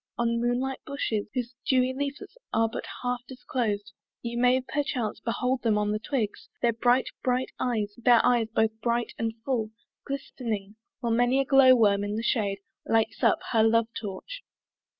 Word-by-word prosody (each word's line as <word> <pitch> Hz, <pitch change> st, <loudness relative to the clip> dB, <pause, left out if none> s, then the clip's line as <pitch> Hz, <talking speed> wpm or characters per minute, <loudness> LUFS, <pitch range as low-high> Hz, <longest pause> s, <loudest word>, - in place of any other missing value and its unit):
On 235 Hz, 0 st, +1 dB
moonlight 250 Hz, +2 st, 0 dB
bushes, 225 Hz, -7 st, -2 dB
Whose 250 Hz, -1 st, -2 dB
dewy 255 Hz, -1 st, +2 dB
leafits 280 Hz, -, -5 dB, 0.2 s
are 225 Hz, 0 st, +3 dB
but 225 Hz, -, -5 dB, 0.2 s
half 245 Hz, -1 st, -1 dB
disclos'd, 220 Hz, -5 st, -3 dB, 0.3 s
You 235 Hz, 0 st, -3 dB
may 250 Hz, +1 st, +4 dB
perchance 255 Hz, -4 st, -2 dB
behold 250 Hz, +2 st, -1 dB
them 220 Hz, -3 st, +2 dB
on 210 Hz, 0 st, +1 dB
the 215 Hz, -, -1 dB
twigs, 230 Hz, -3 st, -3 dB
Their 235 Hz, -1 st, +2 dB
bright, 245 Hz, +3 st, +2 dB
bright 255 Hz, 0 st, 0 dB
eyes, 215 Hz, -5 st, -1 dB
their 240 Hz, -1 st, +5 dB
eyes 240 Hz, -3 st, +3 dB
both 220 Hz, 0 st, +2 dB
bright 235 Hz, 0 st, 0 dB
and 225 Hz, 0 st, 0 dB
full, 235 Hz, -5 st, 0 dB, 0.4 s
Glistning, 230 Hz, -7 st, -4 dB, 0.3 s
while 235 Hz, -2 st, 0 dB
many 245 Hz, +3 st, +3 dB
a 275 Hz, -, +2 dB
glow 265 Hz, -2 st, +7 dB
worm 205 Hz, -4 st, +3 dB
in 205 Hz, +1 st, -2 dB
the 225 Hz, -, -2 dB
shade 200 Hz, -5 st, 0 dB, 0.2 s
Lights 225 Hz, 0 st, +1 dB
up -, -, +3 dB
her 225 Hz, -, +4 dB
love 225 Hz, +1 st, +3 dB
torch. 225 Hz, -, -6 dB
235 Hz, 170 wpm, -27 LUFS, 220-255 Hz, 0.4 s, glow